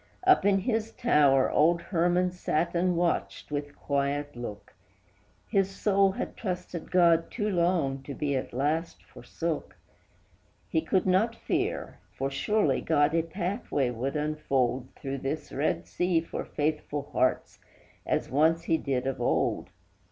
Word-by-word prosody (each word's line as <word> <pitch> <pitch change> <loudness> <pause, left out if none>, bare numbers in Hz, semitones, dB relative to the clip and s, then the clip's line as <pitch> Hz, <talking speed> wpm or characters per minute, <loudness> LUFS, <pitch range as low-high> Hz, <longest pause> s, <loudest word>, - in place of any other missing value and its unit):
Up 370 - +5
in 195 -1 +4
his 225 0 -1
tower 145 - +3
old 170 +3 +4
Herman 175 +1 +1
sat 170 -2 -1
and 175 0 +1
watched 170 -3 -1
with 145 -1 -4
quiet 140 0 -1
look; 110 -4 -8 0.7
His 195 -1 +2
soul 195 0 +2
had - - -5
trusted 180 -4 -5
God 170 -2 +4
too 210 -3 -2
long 170 -7 +1
to 140 0 -7
be 140 -2 -1
at 130 - -3
last 150 +6 -1
forsook; 165 -2 -5 0.9
He 160 - +1
could 180 +3 +1
not 195 +5 +2
fear, - - -2 0.2
for 135 +1 -1
surely 145 -1 +1
God 150 -1 +2
a 165 - +3
pathway 170 - -2
would 130 +5 -3
unfold 135 -4 0
Through 135 -2 -5
this 140 +4 -4
red 145 +3 0
sea 180 -2 +1
for 165 - -5
faithful 150 -1 -2
hearts, 130 - 0 0.4
as - - -1
once 160 +5 +2
he 165 -1 +2
did 130 -3 -1
of 135 -2 -2
old. 120 - 0
160 Hz, 145 wpm, -28 LUFS, 140-180 Hz, 0.9 s, Up